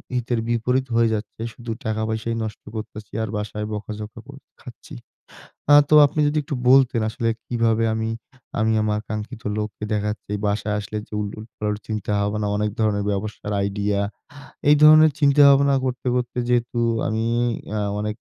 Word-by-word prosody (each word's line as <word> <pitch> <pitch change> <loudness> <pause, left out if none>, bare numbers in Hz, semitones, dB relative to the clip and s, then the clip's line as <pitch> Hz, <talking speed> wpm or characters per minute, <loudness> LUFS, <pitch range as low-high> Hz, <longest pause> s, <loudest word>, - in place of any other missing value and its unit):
হিতের 120 -1 -1
বিপরীত 125 +3 0
হয়ে 115 -1 +4
যাচ্ছে। 105 +1 -7
শুধু 120 -1 -7
টাকা 110 0 -1
পয়সাই 110 +1 -2
নষ্ট 110 - -7
করতেছি 110 -1 -7
আর 110 - -4
বাসায় 105 0 -4
বকাঝকা 105 +1 -6
কোর - - -12 0.2
খাচ্ছি। - - -12 0.8
আ - - +10
তো - - +4
আপনি 155 - -7
যোদি 150 +1 +1
একটু 140 -1 -4
বলতেন 130 -3 +5
আসলে 115 +1 -2 0.2
কিভাবে 115 -2 +1
আমি, 110 0 -2 0.5
আমি 110 0 +2
আমার 105 0 0
কাঙ্ক্ষিত 110 +2 -5 0.2
লক্ষ্যে 105 0 -4
দেখা 105 0 0
যাচ্ছে 105 -1 -10
বাসায় 105 0 -1
আসলে 105 +1 -5
যে, - - -35
উল 105 - -2
উলট 110 +1 -10
পালট 105 0 -2
চিন্তা 105 -1 -3
হবে 105 +1 -1
না, - - 0
অনেক 105 0 0
ধরণের 105 -2 +1
ব্যবসার 105 +1 -4
আইডিয়া 100 0 -1 0.7
এই 150 - +7
ধরনের 155 0 +8
চিন্তা 145 0 +5
ভাবনা 140 0 +4
করতে, 125 0 -3
করতে 125 0 -3
যেহেতু 120 0 0 0.3
আমি 110 +1 -1 0.5
এ্যা 105 -1 -2 0.2
অনেক 105 0 -3
110 Hz, 170 wpm, -22 LUFS, 105-120 Hz, 0.8 s, আ